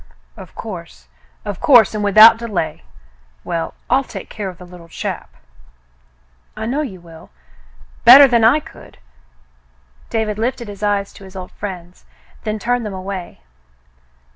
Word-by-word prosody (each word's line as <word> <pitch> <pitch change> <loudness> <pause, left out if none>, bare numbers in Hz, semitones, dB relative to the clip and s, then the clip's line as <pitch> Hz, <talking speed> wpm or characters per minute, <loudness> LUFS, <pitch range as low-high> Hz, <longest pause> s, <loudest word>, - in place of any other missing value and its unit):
Of - - -13
course, 180 -7 -9 0.4
of 205 -3 -5
course, 240 -8 +5
and 210 -1 -3
without 215 +3 +8
delay. 215 -8 -4 0.6
Well, 165 -1 -4
I'll 265 +2 +2
take - - -10
care 205 -3 -5
of 180 - -11
the 180 - -12
Httle 175 -1 -14
chap." - - -5 1.3
*'I - - -4
know 265 +6 -1
you 200 -11 -6
will, 165 -2 -15 0.7
better 280 +1 +10
than 235 -3 +2
I 240 +7 +5
could." - - -15 1.1
David 215 -2 -2
lifted 240 0 -2
his 200 0 -10
eyes 205 -1 -1
to - - -14
his 190 0 -14
old 185 -1 -8
friend's, 180 -3 -9 0.4
then 215 0 -2
turned 245 +3 -1
them 210 -3 -5
away. 185 - -7
205 Hz, 145 wpm, -18 LUFS, 185-230 Hz, 1.3 s, better